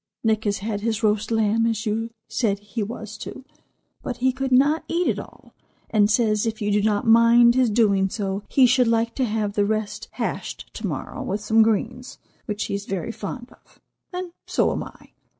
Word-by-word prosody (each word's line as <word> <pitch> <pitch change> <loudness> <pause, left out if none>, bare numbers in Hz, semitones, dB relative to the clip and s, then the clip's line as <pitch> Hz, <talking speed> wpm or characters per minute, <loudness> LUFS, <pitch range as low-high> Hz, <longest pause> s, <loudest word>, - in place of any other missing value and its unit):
Nick 220 -1 +1
has 205 -1 +1
had 210 -2 -2
his 225 0 -1
roast 210 0 +1
lamb, 225 0 +2
as 225 0 -2
you 225 +2 -1 0.2
said 205 -5 0
he 205 +3 -6
was 215 0 -6
to, 265 - -8 0.6
but 240 - -5
he 260 +1 +2
could 265 +1 -3
not 285 +5 +4
eat 345 +3 0
it - - 0
all, - - -13 0.4
and 210 -2 +4
says 215 -1 +2
if 220 -1 -3
you 210 -1 -1
do 205 0 +3
not 205 -1 +1
mind 230 +1 +6
his 255 -1 +3
doing 200 -3 +3
so 195 -1 -3
he 265 - +5
should 250 0 +4
like 230 0 +1
to 260 - 0
have 210 -2 -1
the 205 - +2
rest 215 0 -2
hashed - - -4
to - - -4
morrow - - -5
with 200 +2 -2
some 225 +1 +3
greens, 225 +3 0 0.3
which 210 -1 -2
he - - -4
is 200 0 -4
very 195 +3 -3
fond 240 +3 -7
of, - - -23 0.3
and 360 -1 -5 0.2
so - - +2
am - - -2
I. - - -15
220 Hz, 205 wpm, -23 LUFS, 210-240 Hz, 0.6 s, mind